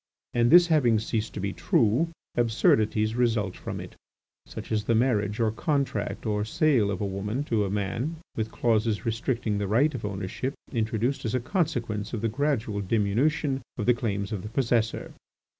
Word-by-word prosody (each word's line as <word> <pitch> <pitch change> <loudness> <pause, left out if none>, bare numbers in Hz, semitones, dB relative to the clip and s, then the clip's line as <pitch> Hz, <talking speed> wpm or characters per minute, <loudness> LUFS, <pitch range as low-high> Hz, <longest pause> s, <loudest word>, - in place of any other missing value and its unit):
And 120 0 +3
this 175 +2 +8
having 145 -9 +3
ceased 110 0 -2
to - - -4
be 100 0 -2
true, 120 +10 +2 0.2
absurdities 110 -2 +2
result 115 -5 +1
from - - -6
it, - - -9 0.5
such - - -8
as 105 -1 0
the 115 - +2
marriage 110 -3 +1
or 110 -2 +2
contract 140 +3 -1
of 105 -1 -1
sale 125 -5 +2
of 100 - -3
a - - 0
woman 105 +7 -2
to 110 -7 0
a - - -2
man, 115 - -2 0.2
with 110 -1 -2
clauses 110 -1 +1
restricting 115 -2 -1
the 100 - -1
right 130 +10 +3
of 125 - -5
ownership 100 +6 -3 0.2
introduced 115 +3 -1
as 115 0 -1
a - - +2
consequence 120 - -2
of 110 - -2
the 115 - +1
gradual 115 -5 -1
diminution 125 +8 +1 0.2
of 105 - -2
the 125 - +5
claims 105 -4 -2
of 105 -4 -3
the 105 - -7
possessor. 115 -2 0
115 Hz, 175 wpm, -27 LUFS, 105-125 Hz, 0.5 s, this